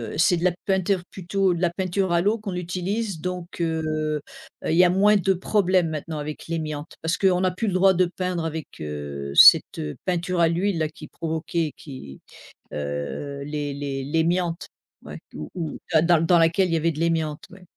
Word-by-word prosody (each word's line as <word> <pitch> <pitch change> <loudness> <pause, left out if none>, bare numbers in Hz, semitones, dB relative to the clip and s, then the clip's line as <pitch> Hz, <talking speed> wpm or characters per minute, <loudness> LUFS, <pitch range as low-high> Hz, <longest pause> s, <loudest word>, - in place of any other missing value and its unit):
heu, - - -5
c'est 175 +2 +4
de 170 - -4
la 180 - +4
peinture 190 -1 +1
plutôt 190 0 0
de 170 - -4
la 175 - +3
peinture 185 +1 -1
à 170 - +3
l'eau 210 +4 +1
qu'on 200 -4 -5
utilise 180 +1 -3
donc, 180 -1 -5
heu 160 -1 -1
heu, 155 -1 -1 0.5
il 160 - +1
y 180 - +7
a 180 - +5
moins 200 +3 +4
de 195 0 +2
problèmes 185 -2 +1
maintenant 155 +1 -5
avec 150 0 -6
l'amiante, 155 -2 -4
parce 165 +2 0
qu'on 185 -2 +3
n'a 185 -1 +2
plus 185 +5 -3
le 195 - 0
droit 190 +1 +5
de 185 0 +3
peindre 180 -2 -2
avec, 160 -1 -4 0.2
heu, 70 -2 -5
cette - - +8 0.3
peinture 180 0 -1
à 170 - +5
l'huile 175 +2 0
là 155 -1 0
qui 155 0 -12
provoquait 160 -1 -3
qui, 130 - -10 0.5
heu, 75 - -4
l'é 145 0 -3
l'é 140 +2 -2
l'amiante, 170 +1 0 0.4
ouais, - - -8 0.2
où 75 - -7
où 165 -4 -4
dans 160 0 +5
dans 170 -2 +4
dans 175 +1 +4
laquelle 165 +3 +3
il - - -1
y - - +3
avait 165 +1 +1
de 155 - -7
l'amiante 160 -2 -1
ouais. 190 0 -15
170 Hz, 205 wpm, -24 LUFS, 155-185 Hz, 0.5 s, cette